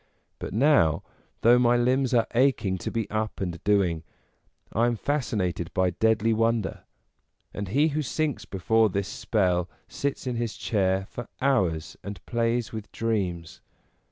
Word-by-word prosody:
But -, -, -5 dB
now, 105 Hz, -, +3 dB, 0.4 s
though 120 Hz, +2 st, +6 dB
my 120 Hz, 0 st, +4 dB
limbs 130 Hz, +2 st, +2 dB
are 115 Hz, -3 st, +3 dB
aching 115 Hz, -7 st, +2 dB
to -, -, -3 dB
be 115 Hz, -3 st, -2 dB
up 110 Hz, 0 st, -2 dB
and 85 Hz, -3 st, -4 dB
doing, 95 Hz, -6 st, +2 dB, 0.7 s
I 115 Hz, +3 st, +3 dB
am 120 Hz, -, +1 dB
fascinated 105 Hz, -, -2 dB
by 95 Hz, -1 st, +2 dB
deadly 110 Hz, +4 st, +2 dB
wonder; 115 Hz, -2 st, 0 dB, 0.7 s
and 100 Hz, 0 st, -4 dB
he 145 Hz, +11 st, +3 dB
who 155 Hz, +1 st, -1 dB
sinks 145 Hz, -5 st, -2 dB
be 95 Hz, -, -7 dB
fore 110 Hz, +4 st, +3 dB
this 100 Hz, 0 st, -2 dB
spell 90 Hz, -4 st, 0 dB, 0.2 s
sits 140 Hz, -1 st, -3 dB
in 125 Hz, -2 st, -2 dB
his 115 Hz, -2 st, -3 dB
chair 95 Hz, -3 st, 0 dB
for 120 Hz, +3 st, -8 dB
hours 95 Hz, -, 0 dB
and 100 Hz, -2 st, -6 dB
plays 115 Hz, -1 st, 0 dB
with 110 Hz, -2 st, -7 dB
dreams. 95 Hz, -8 st, -2 dB
110 Hz, 155 wpm, -26 LUFS, 95-120 Hz, 0.7 s, though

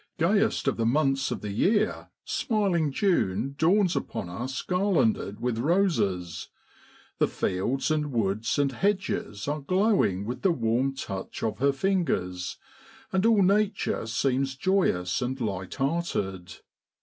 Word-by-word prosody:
AYEST 195 Hz, +5 st, +2 dB
of 135 Hz, -, +1 dB
the 115 Hz, -, 0 dB
months 135 Hz, +1 st, +2 dB
of -, -, -4 dB
the 105 Hz, -, -4 dB
year, 205 Hz, -, +1 dB, 0.2 s
smiling 190 Hz, -, 0 dB
June 135 Hz, -, +1 dB
dawns 180 Hz, +3 st, +3 dB
upon 85 Hz, -, -3 dB
us 125 Hz, +9 st, -4 dB
garlanded 180 Hz, -, +1 dB
with 120 Hz, -1 st, -1 dB
roses; 120 Hz, -, 0 dB, 0.7 s
the -, -, +4 dB
fields 120 Hz, +11 st, -1 dB
and 150 Hz, -2 st, 0 dB
woods 110 Hz, -2 st, 0 dB
and 140 Hz, -1 st, +2 dB
hedges 190 Hz, -, -1 dB
are 150 Hz, +1 st, -2 dB
glowing 185 Hz, -, +2 dB
with 125 Hz, +3 st, -5 dB
the 190 Hz, -, +3 dB
warm 125 Hz, 0 st, 0 dB
touch 95 Hz, -8 st, -6 dB
of 110 Hz, 0 st, -2 dB
her 140 Hz, +2 st, +3 dB
fingers, 135 Hz, -, -1 dB, 0.5 s
and 190 Hz, +3 st, +2 dB
all 220 Hz, -4 st, +5 dB
nature 200 Hz, -, +1 dB
seems 135 Hz, +3 st, 0 dB
joyous 130 Hz, -, +1 dB
and 130 Hz, +2 st, -2 dB
light 95 Hz, -5 st, -3 dB
hearted. 135 Hz, -, -2 dB
135 Hz, 135 wpm, -27 LUFS, -, 0.7 s, all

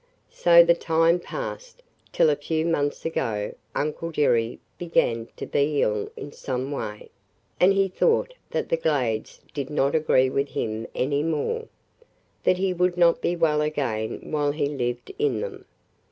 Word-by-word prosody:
"So 170 Hz, 0 st, +7 dB
the 170 Hz, 0 st, +5 dB
time 165 Hz, +1 st, +2 dB
passed, -, -, -7 dB, 0.3 s
till 155 Hz, -, +4 dB
a -, -, +2 dB
few 160 Hz, +2 st, -2 dB
months 145 Hz, -4 st, -1 dB
ago 110 Hz, -10 st, -2 dB, 0.2 s
Uncle 155 Hz, +3 st, -2 dB
Jerry 120 Hz, -7 st, +1 dB, 0.2 s
began 115 Hz, -9 st, +1 dB
to -, -, -6 dB
be 145 Hz, 0 st, +1 dB
ill 105 Hz, -1 st, -1 dB
in 145 Hz, -, -7 dB
some 130 Hz, 0 st, -4 dB
way, 105 Hz, -7 st, -5 dB, 0.5 s
and 185 Hz, -, +6 dB
he 195 Hz, 0 st, +3 dB
thought 465 Hz, -, +1 dB, 0.2 s
that -, -, -2 dB
the 165 Hz, -, +2 dB
Glades 130 Hz, -9 st, -1 dB
did 140 Hz, -2 st, -4 dB
not 140 Hz, -2 st, +1 dB
agree 130 Hz, -5 st, +3 dB
with 140 Hz, +1 st, 0 dB
him 110 Hz, 0 st, -3 dB
any 140 Hz, +2 st, 0 dB
more 165 Hz, -, -1 dB, 0.4 s
– -, -, -41 dB
that 185 Hz, -, +4 dB
he 190 Hz, 0 st, 0 dB
would 180 Hz, 0 st, +1 dB
not 170 Hz, -1 st, +4 dB
be 175 Hz, -, 0 dB
well 155 Hz, -3 st, +2 dB
again 135 Hz, -8 st, -2 dB
while 145 Hz, -2 st, +1 dB
he 150 Hz, -1 st, 0 dB
lived 125 Hz, -4 st, -3 dB
in 435 Hz, 0 st, +1 dB
them. -, -, -6 dB
150 Hz, 165 wpm, -25 LUFS, 130-170 Hz, 0.5 s, So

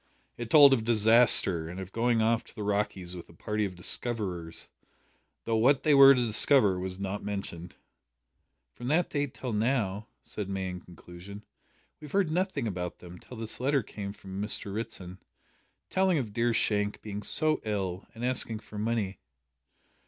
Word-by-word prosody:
It 120 Hz, -1 st, -7 dB
told 140 Hz, 0 st, +8 dB
of 115 Hz, -4 st, +1 dB
disaster, 110 Hz, -7 st, +4 dB
and 90 Hz, +2 st, -7 dB
of 95 Hz, 0 st, -8 dB
going 115 Hz, 0 st, +1 dB
off 115 Hz, 0 st, +1 dB
to -, -, -16 dB
the 105 Hz, -, -5 dB
"Rockies" 100 Hz, -3 st, -2 dB
with 85 Hz, -, -10 dB
a -, -, -15 dB
party 105 Hz, +4 st, -2 dB
of 95 Hz, -2 st, -6 dB
"discoverers," 90 Hz, -4 st, -1 dB, 0.8 s
though 115 Hz, -1 st, 0 dB
what 135 Hz, +4 st, +3 dB
they 150 Hz, -, +4 dB
were 140 Hz, 0 st, +9 dB
to 125 Hz, -1 st, +1 dB
discover 110 Hz, -3 st, +4 dB
was 95 Hz, 0 st, -5 dB
not 100 Hz, +1 st, -4 dB
mentioned. 100 Hz, -4 st, -6 dB, 1.0 s
"From 120 Hz, -, -8 dB
that 160 Hz, +5 st, +1 dB
date 145 Hz, -3 st, -2 dB
till 125 Hz, -3 st, -5 dB
now," 105 Hz, -3 st, -1 dB, 0.2 s
said 105 Hz, -2 st, -6 dB
May 95 Hz, -1 st, -3 dB
in 90 Hz, 0 st, -6 dB
conclusion, 90 Hz, +4 st, -12 dB, 0.5 s
"we 155 Hz, -, -11 dB
have 150 Hz, -, -12 dB
heard 195 Hz, -5 st, +1 dB
nothing 180 Hz, -, -1 dB
about 90 Hz, -4 st, -4 dB
them 90 Hz, 0 st, -12 dB
till 125 Hz, -, -12 dB
this 110 Hz, -1 st, -4 dB
letter 135 Hz, 0 st, +1 dB
came 100 Hz, -1 st, -7 dB
from 95 Hz, -1 st, -8 dB
Mr 105 Hz, -1 st, +1 dB
Ritson, 95 Hz, -4 st, -6 dB, 0.7 s
telling 190 Hz, -2 st, +2 dB
of 115 Hz, -7 st, -3 dB
dear 120 Hz, +2 st, +1 dB
Shank 105 Hz, -2 st, 0 dB
being 105 Hz, -1 st, -6 dB
so 155 Hz, +8 st, +1 dB
ill, 95 Hz, -4 st, -3 dB
and 115 Hz, +2 st, -4 dB
asking 125 Hz, -3 st, -1 dB
for 105 Hz, -, -9 dB
money." 105 Hz, -4 st, -2 dB
105 Hz, 175 wpm, -28 LUFS, 95-125 Hz, 1.0 s, were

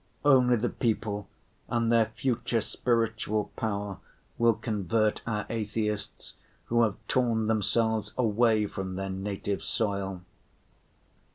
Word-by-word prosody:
Only 130 Hz, -3 st, +6 dB
the 120 Hz, +1 st, 0 dB
people 105 Hz, -3 st, -1 dB, 0.4 s
and 115 Hz, -1 st, +1 dB
their 115 Hz, -2 st, +4 dB
future 115 Hz, 0 st, -1 dB
spiritual 110 Hz, -1 st, 0 dB
power 100 Hz, -3 st, -3 dB, 0.4 s
will 115 Hz, -1 st, +5 dB
convert 110 Hz, -1 st, 0 dB
our 105 Hz, -2 st, -1 dB
atheists, 105 Hz, -2 st, -3 dB, 0.3 s
who 120 Hz, 0 st, +2 dB
have 110 Hz, -4 st, +2 dB
torn 115 Hz, -3 st, +2 dB
themselves 110 Hz, 0 st, +1 dB
away 110 Hz, -2 st, +3 dB
from 95 Hz, -2 st, -5 dB
their 95 Hz, 0 st, -3 dB
native 100 Hz, +1 st, -3 dB
soil. 100 Hz, -4 st, -2 dB
110 Hz, 110 wpm, -28 LUFS, 100-115 Hz, 0.4 s, Only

